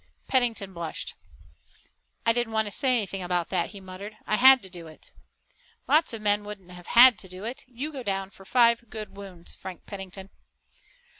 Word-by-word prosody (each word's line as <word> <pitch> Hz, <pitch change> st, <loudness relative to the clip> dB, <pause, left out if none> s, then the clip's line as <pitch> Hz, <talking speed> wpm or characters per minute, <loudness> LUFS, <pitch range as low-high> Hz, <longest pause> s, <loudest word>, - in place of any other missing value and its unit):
Pennington 230 Hz, -7 st, +1 dB
blushed. 170 Hz, -2 st, -6 dB, 1.1 s
"I 230 Hz, -, +5 dB
didn't 240 Hz, -1 st, -1 dB
want 220 Hz, 0 st, +2 dB
to 205 Hz, -, -4 dB
say 265 Hz, +5 st, +2 dB
anything 195 Hz, -3 st, -2 dB
about 180 Hz, -1 st, -1 dB
that," 175 Hz, -3 st, 0 dB
he 200 Hz, -, -10 dB
muttered. 190 Hz, +3 st, -9 dB
"I 215 Hz, -, +1 dB
had 260 Hz, -1 st, +7 dB
to 190 Hz, -, -9 dB
do 170 Hz, -2 st, -9 dB
it." 155 Hz, -, -15 dB, 0.8 s
"Lots 315 Hz, +2 st, +4 dB
of 225 Hz, -2 st, -6 dB
men 205 Hz, 0 st, +2 dB
wouldn't 200 Hz, -3 st, -9 dB
have 180 Hz, -1 st, -12 dB
had 245 Hz, 0 st, +8 dB
to 190 Hz, -, -7 dB
do 185 Hz, +2 st, -10 dB
it. 235 Hz, +4 st, -5 dB
You 260 Hz, +5 st, -5 dB
go 275 Hz, -3 st, -6 dB
down 195 Hz, -3 st, -3 dB
for 195 Hz, -, -15 dB
five 235 Hz, +1 st, +3 dB
good 215 Hz, -2 st, -7 dB
wounds, 190 Hz, -4 st, -3 dB
Frank 185 Hz, -3 st, -10 dB
Pennington." 195 Hz, -1 st, -8 dB
205 Hz, 190 wpm, -26 LUFS, 185-235 Hz, 1.1 s, had